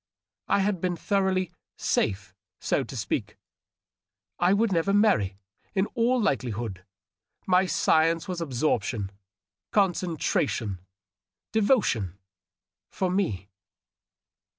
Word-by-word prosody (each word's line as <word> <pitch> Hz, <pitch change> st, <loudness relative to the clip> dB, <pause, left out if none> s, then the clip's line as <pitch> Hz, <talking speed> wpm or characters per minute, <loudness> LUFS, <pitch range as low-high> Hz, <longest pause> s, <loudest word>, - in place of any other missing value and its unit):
I 200 Hz, -, +3 dB
had 195 Hz, -3 st, 0 dB
been 180 Hz, -1 st, 0 dB
thoroughly 190 Hz, -2 st, 0 dB, 0.2 s
" -, -, -67 dB
safe," 100 Hz, -1 st, 0 dB, 0.3 s
so -, -, 0 dB
to -, -, -8 dB
speak; -, -, -3 dB, 1.0 s
I 175 Hz, +1 st, +4 dB
would 210 Hz, +2 st, +3 dB
never 180 Hz, +2 st, +2 dB
marry, 195 Hz, -, +3 dB, 0.4 s
in 190 Hz, 0 st, +3 dB
all 245 Hz, +1 st, +2 dB
likelihood; 120 Hz, -, -1 dB, 0.6 s
my 185 Hz, 0 st, +4 dB
science 165 Hz, 0 st, +2 dB
was 180 Hz, -2 st, -3 dB
absorption, 120 Hz, -8 st, -1 dB, 0.6 s
concentration, 165 Hz, -, 0 dB, 0.7 s
devotion, 200 Hz, -, +2 dB, 0.7 s
for 185 Hz, -2 st, -1 dB
me. 170 Hz, -, -1 dB
175 Hz, 100 wpm, -27 LUFS, -, 1.0 s, I